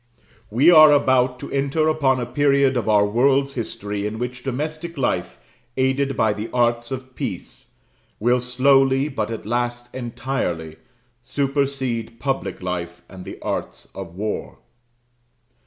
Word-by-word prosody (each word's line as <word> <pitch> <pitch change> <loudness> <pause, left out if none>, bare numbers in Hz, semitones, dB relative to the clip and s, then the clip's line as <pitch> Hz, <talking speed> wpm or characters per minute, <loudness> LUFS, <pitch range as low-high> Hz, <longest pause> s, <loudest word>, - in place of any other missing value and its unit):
We 135 +11 +5
are 155 -2 +9
about 130 -3 +3
to - - -7
enter 140 +3 +1
upon 140 -5 +2
a 120 - -2
period 140 +1 +2
of 120 -3 -1
our 105 -1 +5
world's 135 +6 +2
history 105 -4 -4
in 110 +1 -5
which 125 +1 -4
domestic 155 +6 -4
life, 90 -9 -1 0.4
aided 135 0 +1
by 110 -1 +3
the 105 +2 -5
arts 120 -1 +1
of 130 -1 -6
peace, - - -6 0.5
will 120 +3 +3
slowly, 135 +2 +3
but 110 -6 -3
at 115 -3 -6
last 120 +1 -2
entirely, 115 -10 -3 0.4
supersede 130 -3 -2
public 120 -8 -3
life 85 -1 -4
and 95 -1 -11
the - - -8
arts - - -4
of 90 -3 -8
war. 105 +3 -4
125 Hz, 140 wpm, -22 LUFS, 110-135 Hz, 0.5 s, are